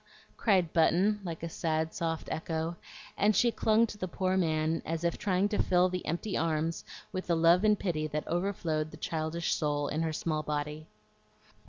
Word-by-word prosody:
cried 185 Hz, -7 st, +2 dB
Button, 185 Hz, +5 st, +3 dB
like 170 Hz, -3 st, -6 dB
a -, -, -1 dB
sad, 160 Hz, -1 st, -1 dB
soft 165 Hz, -1 st, -3 dB
echo; 160 Hz, +1 st, -2 dB, 0.4 s
and 210 Hz, 0 st, +3 dB
she 240 Hz, -, +4 dB
clung 220 Hz, 0 st, +3 dB
to 210 Hz, -2 st, -9 dB
the 185 Hz, -, -2 dB
poor 185 Hz, +1 st, -1 dB
man 160 Hz, -2 st, +1 dB
as 165 Hz, +1 st, -3 dB
if 170 Hz, -1 st, +1 dB
trying 195 Hz, -1 st, +1 dB
to 210 Hz, -, +1 dB
fill 180 Hz, 0 st, +3 dB
the 180 Hz, 0 st, -3 dB
empty 175 Hz, +6 st, -2 dB
arms 160 Hz, 0 st, 0 dB, 0.3 s
with 185 Hz, -, -4 dB
the 170 Hz, -, +2 dB
love 170 Hz, +3 st, +5 dB
and 210 Hz, -1 st, +4 dB
pity 155 Hz, -6 st, -1 dB
that 150 Hz, 0 st, -4 dB
over 175 Hz, +4 st, 0 dB
flowed 155 Hz, -5 st, -2 dB
the 155 Hz, -, -11 dB
childish 160 Hz, +1 st, -2 dB
soul 145 Hz, -2 st, 0 dB
in 155 Hz, -, -1 dB
her 165 Hz, -1 st, 0 dB
small 155 Hz, 0 st, -1 dB
body. 150 Hz, +1 st, -4 dB
165 Hz, 190 wpm, -30 LUFS, 155-185 Hz, 0.4 s, love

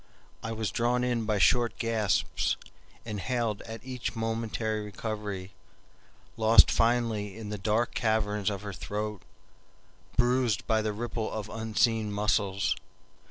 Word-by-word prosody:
I 115 Hz, -, -4 dB
was 110 Hz, -3 st, -2 dB
drawn 120 Hz, +3 st, +1 dB
in 120 Hz, -2 st, 0 dB
by 105 Hz, -1 st, +1 dB
short 120 Hz, +4 st, +3 dB
gasps, 115 Hz, -3 st, +1 dB, 0.5 s
inhaled 115 Hz, 0 st, -1 dB
at 115 Hz, +1 st, -8 dB
each 125 Hz, -2 st, -4 dB
momentary 115 Hz, -1 st, -1 dB
recovery, 105 Hz, -2 st, -5 dB, 0.9 s
lost 110 Hz, +1 st, +7 dB
finally 115 Hz, -4 st, +1 dB
in 110 Hz, -2 st, -6 dB
the 105 Hz, -1 st, -4 dB
dark 110 Hz, +4 st, +1 dB
caverns 105 Hz, -2 st, +1 dB
of 100 Hz, -1 st, -4 dB
her 100 Hz, -1 st, -5 dB
throat, 105 Hz, +1 st, -4 dB, 1.0 s
bruised 120 Hz, -3 st, +2 dB
by 110 Hz, -1 st, +2 dB
the 110 Hz, 0 st, -1 dB
ripple 110 Hz, +1 st, -3 dB
of 110 Hz, -1 st, -4 dB
unseen 110 Hz, -1 st, +1 dB
muscles. 100 Hz, -1 st, +1 dB
110 Hz, 125 wpm, -29 LUFS, 105-115 Hz, 1.0 s, lost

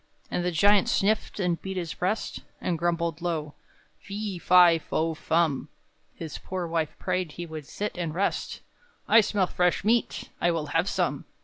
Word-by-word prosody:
And 175 Hz, -, -1 dB
the 180 Hz, -, +1 dB
Giant 200 Hz, +4 st, +4 dB
sniffed, 210 Hz, +1 st, +1 dB
and 180 Hz, -3 st, 0 dB
beat 190 Hz, -1 st, -5 dB
his 170 Hz, -3 st, -3 dB
breast, 195 Hz, +5 st, -2 dB, 0.2 s
And 170 Hz, -3 st, -2 dB
grumbled 170 Hz, -1 st, -1 dB
low, 160 Hz, -4 st, -2 dB, 0.5 s
"Fe, 200 Hz, -2 st, -5 dB
fi, 175 Hz, -2 st, +6 dB
fo, 160 Hz, +1 st, -1 dB
fum!" 155 Hz, -3 st, 0 dB, 0.5 s
His 160 Hz, -3 st, -7 dB
poor 185 Hz, -1 st, -4 dB
wife 165 Hz, -2 st, -2 dB
prayed 185 Hz, -4 st, -2 dB
he 175 Hz, -, -6 dB
would 155 Hz, -3 st, -8 dB
sit 210 Hz, +1 st, -4 dB
and 170 Hz, -3 st, -2 dB
rest, 190 Hz, +6 st, -2 dB, 0.5 s
"I 230 Hz, -, +7 dB
smell 205 Hz, -2 st, +1 dB
fresh 180 Hz, -1 st, +1 dB
meat! 230 Hz, +3 st, +1 dB
I 175 Hz, -, +3 dB
will 165 Hz, -3 st, 0 dB
have 165 Hz, +4 st, +2 dB
some!" -, -, -1 dB
175 Hz, 170 wpm, -27 LUFS, 165-190 Hz, 0.5 s, I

